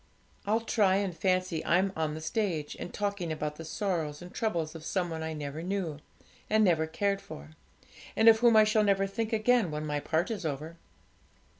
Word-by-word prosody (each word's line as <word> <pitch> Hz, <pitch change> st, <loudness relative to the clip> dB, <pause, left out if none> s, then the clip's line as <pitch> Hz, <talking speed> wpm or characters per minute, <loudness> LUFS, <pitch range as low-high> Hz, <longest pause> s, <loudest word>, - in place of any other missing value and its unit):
I'll 220 Hz, +3 st, +2 dB
try 205 Hz, -4 st, +2 dB
and 195 Hz, -3 st, -1 dB
fancy 185 Hz, -3 st, 0 dB
I'm 190 Hz, +3 st, +2 dB
on 155 Hz, -1 st, -1 dB
the 160 Hz, -, -6 dB
stage, 160 Hz, -4 st, -2 dB
and -, -, -6 dB
talking 200 Hz, -5 st, -2 dB
about 150 Hz, -1 st, -3 dB
the 165 Hz, -, -7 dB
sorrows 160 Hz, -4 st, -2 dB
and 180 Hz, 0 st, -11 dB
troubles 170 Hz, -8 st, -1 dB
of 165 Hz, -2 st, -9 dB
some 175 Hz, 0 st, -1 dB
one 160 Hz, 0 st, -4 dB
I 160 Hz, 0 st, -3 dB
never 150 Hz, 0 st, -5 dB
knew, 175 Hz, -4 st, -3 dB, 0.5 s
and 215 Hz, 0 st, +4 dB
never 165 Hz, -5 st, +3 dB
cared 200 Hz, +4 st, -1 dB
for, 75 Hz, +2 st, -10 dB, 0.6 s
and 225 Hz, -, +3 dB
of 225 Hz, -1 st, +8 dB
whom 235 Hz, -1 st, +5 dB
I 215 Hz, -, +8 dB
shall 215 Hz, 0 st, +3 dB
never 195 Hz, -1 st, +2 dB
think 215 Hz, +3 st, -3 dB
again 225 Hz, -2 st, +3 dB
when 150 Hz, 0 st, -4 dB
my 150 Hz, -1 st, -1 dB
part 160 Hz, +7 st, -1 dB
is 210 Hz, -5 st, -4 dB
over. 155 Hz, +2 st, -4 dB
180 Hz, 195 wpm, -29 LUFS, 160-205 Hz, 0.6 s, of